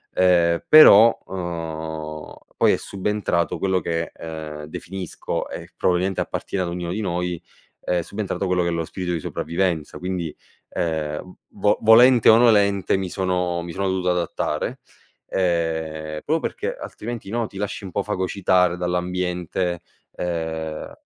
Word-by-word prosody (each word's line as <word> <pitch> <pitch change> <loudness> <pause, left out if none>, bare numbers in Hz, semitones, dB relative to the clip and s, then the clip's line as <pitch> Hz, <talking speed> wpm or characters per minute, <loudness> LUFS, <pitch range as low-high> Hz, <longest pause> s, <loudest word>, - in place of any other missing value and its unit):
ehm, 85 -2 +3
però, 115 -7 +9
uhm, 80 -3 -5 0.2
poi - - +5
è - - +1
subentrato 100 -3 -1
quello 95 -1 +1
che, 85 +1 -2
ehm, 80 -2 -7
definisco 90 +3 -5
e - - -8
probabilmente 90 +1 +1
appartiene 95 - -3
ad 90 - -3
ognuno 85 -1 -4
di 105 - -2
noi, 90 -3 -2 0.4
è 90 -1 0
subentrato 100 +2 -3
quello 90 -1 +2
che 85 - 0
è - - -1
lo 85 -1 -1
spirito 90 +1 -4
di 85 - -1
sopravvivenza. 85 -1 -2
Quindi, 90 -4 -3 0.3
ehm, 80 +1 -3
v 105 +1 +1
volente 120 +2 +7
o 110 - +8
nolente, 100 -5 +4
mi 95 -1 -3
sono 90 -2 -1
mi 85 - -6
sono 95 +2 -1
dovuto 95 -1 0
adattare, 85 -3 -2 0.5
ehm, 80 -3 -1
proprio 160 +2 +1
perché, 455 - -3
altrimenti, 120 - -7
no, 115 +1 -1
ti 95 - -12
lasci 100 0 -4
un 95 - -7
po' 100 - -1
fagocitare 95 -2 +1
dall'ambiente, 90 0 -2 0.3
ehm 80 -2 -4
90 Hz, 140 wpm, -23 LUFS, 85-95 Hz, 0.5 s, però